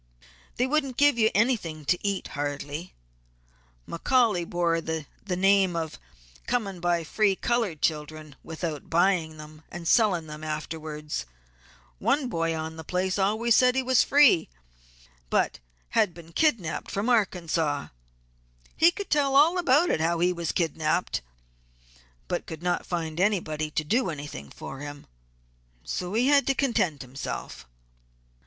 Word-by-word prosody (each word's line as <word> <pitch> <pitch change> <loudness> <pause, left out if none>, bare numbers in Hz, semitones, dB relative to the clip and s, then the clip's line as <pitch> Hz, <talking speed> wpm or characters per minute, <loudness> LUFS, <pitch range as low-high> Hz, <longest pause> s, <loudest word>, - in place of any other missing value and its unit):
"They 250 - +1
wouldn't 275 -2 0
give 285 -4 +4
you 220 -1 +5
anything 195 - 0
to 180 - +2
eat 200 -1 -2
hardly. 145 +3 -5 0.9
McCaully 210 -2 +1
bore 170 -1 +1
the 160 -2 -4 0.2
name 190 0 +3
of 160 -2 -4 0.5
coming 205 -7 -1
by 175 -1 +1
free 200 +4 +1
colored 220 -9 -1
children 155 -1 -2
without 160 -2 -5
buying 170 -2 +2
them, 155 0 -12
and 170 0 -7
selling 195 -8 +3
them 150 0 -9
afterwards. 155 - -5 0.7
One 275 -3 +1
boy 165 -4 -1
on 160 0 -5
the 160 - -7
place 185 +4 -1
always 220 +4 +2
said 250 0 +4
that - - -1
he 265 - +2
was 255 0 +4
free 280 - +5 0.8
but - - +1 0.3
had 175 - +2
been 165 -1 -13
kidnapped 230 - 0
from 200 +4 -2
Arkansas. 170 - 0 0.9
He 330 - +6
could 395 +2 -7
tell 280 -3 +2
all 325 +6 +5
about 300 - +3
how 165 +2 +1
he 180 +2 +2
was 170 -2 -2
kidnapped, 160 - 0 1.1
but - - -3
could 160 +1 -8
not 180 0 -1
find 165 -2 -3
anybody 165 -6 0
to 155 - -1
do 230 - +1
anything 145 - -7
for 135 - -9
him, 145 0 -8 0.8
so 180 +3 -4
he 240 +3 +3
had 285 -1 +4
to 275 - +2
content 190 - 0
himself. 125 - -7
175 Hz, 140 wpm, -26 LUFS, 155-230 Hz, 1.1 s, He